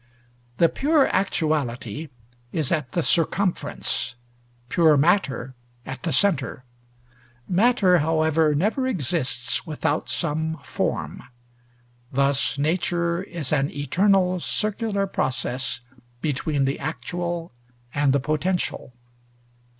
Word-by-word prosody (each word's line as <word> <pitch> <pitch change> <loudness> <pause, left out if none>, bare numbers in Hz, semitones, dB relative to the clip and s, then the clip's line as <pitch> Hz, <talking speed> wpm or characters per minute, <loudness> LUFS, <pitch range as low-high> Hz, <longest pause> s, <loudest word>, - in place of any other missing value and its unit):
The 170 - +5
pure 290 - +2
actuality 150 - -1 0.4
is 155 -5 -1
at 150 -7 -1
the 170 - +1
circumference, 165 -7 +1 0.5
pure 160 0 +4
matter 140 -5 +1 0.3
at 130 -1 -6
the 170 - -2
centre. 150 -10 +1 0.8
Matter, 190 -2 +4
however, 160 0 +2
never 220 - +1
exists 140 - -1
without 155 0 -1
some 160 0 -1
form. - - -3 0.9
Thus, 140 +1 +2
nature 170 +3 0
is 170 -7 -3
an 140 -1 +2
eternal 185 +5 +2
circular 210 +1 -1
process 130 -6 -2 0.4
between 145 0 0
the 135 - -1
actual 170 +1 -4 0.4
and 145 -1 +2
the 140 - +3
potential. 155 -1 -1
160 Hz, 95 wpm, -24 LUFS, 140-180 Hz, 0.9 s, The